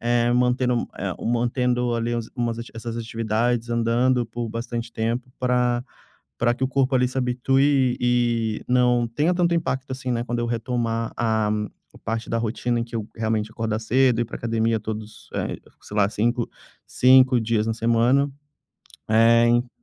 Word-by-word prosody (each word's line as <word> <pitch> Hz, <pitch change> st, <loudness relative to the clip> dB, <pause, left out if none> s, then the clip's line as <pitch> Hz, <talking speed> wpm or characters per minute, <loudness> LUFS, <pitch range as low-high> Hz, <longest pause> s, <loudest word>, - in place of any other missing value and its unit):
eh, 120 Hz, 0 st, +2 dB
mantendo 125 Hz, 0 st, +1 dB
eh -, -, -3 dB
mantendo, 120 Hz, +1 st, 0 dB
ali, 115 Hz, 0 st, -1 dB, 0.2 s
umas 120 Hz, -2 st, -1 dB
essas 115 Hz, 0 st, -6 dB
atividades 115 Hz, +1 st, -1 dB
andando 120 Hz, +2 st, +2 dB
por 115 Hz, +1 st, -5 dB
bastante 115 Hz, +1 st, -5 dB
tempo 115 Hz, +3 st, -2 dB
pra 125 Hz, -1 st, +1 dB, 0.6 s
pra 120 Hz, 0 st, +2 dB
que 125 Hz, -, -4 dB
o -, -, +2 dB
corpo, 135 Hz, 0 st, +1 dB
ali, 125 Hz, -1 st, +3 dB
se 130 Hz, -, -6 dB
habitue 130 Hz, +1 st, +2 dB
e 120 Hz, -3 st, +1 dB
e -, -, -12 dB
não 125 Hz, -1 st, +3 dB
tenha 150 Hz, +10 st, +1 dB
tanto 175 Hz, -1 st, +2 dB
impacto, 135 Hz, -5 st, -2 dB
assim, 130 Hz, -1 st, -3 dB
né, 120 Hz, -1 st, -1 dB
quando 120 Hz, 0 st, -3 dB
eu 120 Hz, -, 0 dB
retomar 115 Hz, -1 st, -2 dB
a 110 Hz, -2 st, +1 dB, 0.4 s
a -, -, -16 dB
parte 115 Hz, 0 st, -4 dB
da 115 Hz, -, 0 dB
rotina 120 Hz, +1 st, -1 dB
em -, -, -1 dB
que 115 Hz, 0 st, -9 dB
eu 110 Hz, -2 st, -3 dB
realmente 110 Hz, -1 st, -1 dB
acordar 110 Hz, -1 st, -2 dB
cedo, 120 Hz, +1 st, +2 dB
ir -, -, 0 dB
pra 115 Hz, -, -9 dB
academia 115 Hz, -1 st, 0 dB
todos, 110 Hz, 0 st, -7 dB
eh, -, -, -3 dB, 0.2 s
sei 105 Hz, -, -8 dB
lá, 100 Hz, -1 st, +4 dB
5- 115 Hz, +3 st, 0 dB, 0.4 s
5 130 Hz, -1 st, +5 dB
dias 110 Hz, -1 st, 0 dB
na 115 Hz, -, 0 dB
semana. 120 Hz, +5 st, +2 dB, 0.8 s
Eh, 115 Hz, +1 st, +5 dB
hein 120 Hz, +1 st, +2 dB
120 Hz, 170 wpm, -23 LUFS, 115-125 Hz, 0.8 s, 5